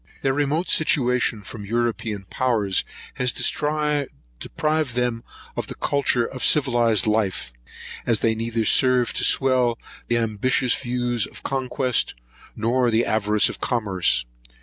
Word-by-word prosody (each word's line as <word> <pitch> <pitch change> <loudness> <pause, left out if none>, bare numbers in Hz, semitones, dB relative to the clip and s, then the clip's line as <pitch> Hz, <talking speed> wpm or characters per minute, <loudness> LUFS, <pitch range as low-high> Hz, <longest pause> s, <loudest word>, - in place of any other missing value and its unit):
Their 135 - +2
remote 145 +5 0
situation 125 -7 +1
from 105 +1 -8
European 110 -2 -2
powers 110 -7 0 0.4
has 125 -1 +2
deprived 150 - -1
them 120 -2 -1 0.3
of - - -3
the - - -7
culture 135 -4 +1
of 130 +1 -7
civilised 120 -7 +3
life, 105 - -1 0.5
as 115 -4 +1
they 115 - +2
neither 115 0 -2
serve 125 +1 +3
to - - -2
swell 125 -3 +3 0.3
the 120 - +1
ambitious 115 +3 +1
views 120 -3 -1
of - - -12
conquest, 130 -2 0 0.4
nor 120 +3 +1
the 115 +1 +2
avarice 105 -1 +2
of - - -6
commerce. 100 - 0
120 Hz, 125 wpm, -23 LUFS, 110-130 Hz, 0.5 s, civilised